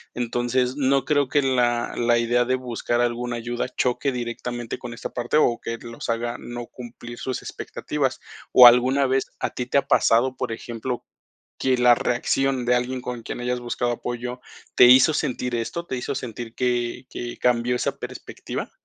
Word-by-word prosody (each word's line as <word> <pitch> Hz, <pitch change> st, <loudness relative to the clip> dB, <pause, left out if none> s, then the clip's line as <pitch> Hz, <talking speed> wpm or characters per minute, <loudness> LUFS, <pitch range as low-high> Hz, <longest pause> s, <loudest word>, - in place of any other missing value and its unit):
Entonces, 120 Hz, +1 st, 0 dB
no 135 Hz, -1 st, +2 dB
creo 145 Hz, -2 st, +2 dB
que 145 Hz, -, +3 dB
la 120 Hz, -2 st, +1 dB
la 120 Hz, 0 st, +3 dB
idea 120 Hz, +1 st, +2 dB
de 130 Hz, +1 st, +1 dB
buscar 120 Hz, -1 st, -2 dB
alguna 120 Hz, 0 st, -1 dB
ayuda 120 Hz, +2 st, -3 dB
choque 130 Hz, +2 st, +1 dB
directamente 120 Hz, -1 st, -4 dB
con 120 Hz, -1 st, -7 dB
esta -, -, -6 dB
parte, 120 Hz, +4 st, 0 dB
o 120 Hz, -6 st, +3 dB
que 115 Hz, -, -4 dB
los 115 Hz, 0 st, -8 dB
haga 120 Hz, +1 st, -1 dB
no 120 Hz, 0 st, -7 dB
cumplir 120 Hz, -1 st, -10 dB
sus 130 Hz, -, -3 dB
expectativas, 135 Hz, -3 st, -3 dB, 0.3 s
o 125 Hz, -, +10 dB
¿alguna 130 Hz, +3 st, +5 dB
vez 130 Hz, +1 st, +1 dB
a -, -, -2 dB
ti 125 Hz, -, -4 dB
te 140 Hz, -, +1 dB
ha 140 Hz, -, -6 dB
pasado, 130 Hz, +3 st, +3 dB
por 125 Hz, -3 st, -3 dB
ejemplo, 120 Hz, +2 st, -5 dB, 0.5 s
que 130 Hz, -1 st, +1 dB
la 125 Hz, 0 st, +6 dB
reacción 125 Hz, +1 st, 0 dB
de 125 Hz, -, +4 dB
alguien 125 Hz, +1 st, -2 dB
con 125 Hz, -2 st, -5 dB
quien 120 Hz, -, -6 dB
hayas 125 Hz, 0 st, -2 dB
buscado 120 Hz, 0 st, -1 dB
apoyo 120 Hz, +1 st, -5 dB, 0.4 s
te -, -, +9 dB
hizo 130 Hz, +5 st, +7 dB
sentir 125 Hz, -4 st, -2 dB
esto 170 Hz, +9 st, -4 dB
te 130 Hz, -, -3 dB
hizo 125 Hz, -, -3 dB
sentir 120 Hz, -2 st, -6 dB
que 120 Hz, 0 st, -1 dB
que 120 Hz, 0 st, -6 dB
cambió 125 Hz, 0 st, +2 dB
esa -, -, -2 dB
perspectiva? -, -, -6 dB
125 Hz, 180 wpm, -24 LUFS, 120-130 Hz, 0.5 s, o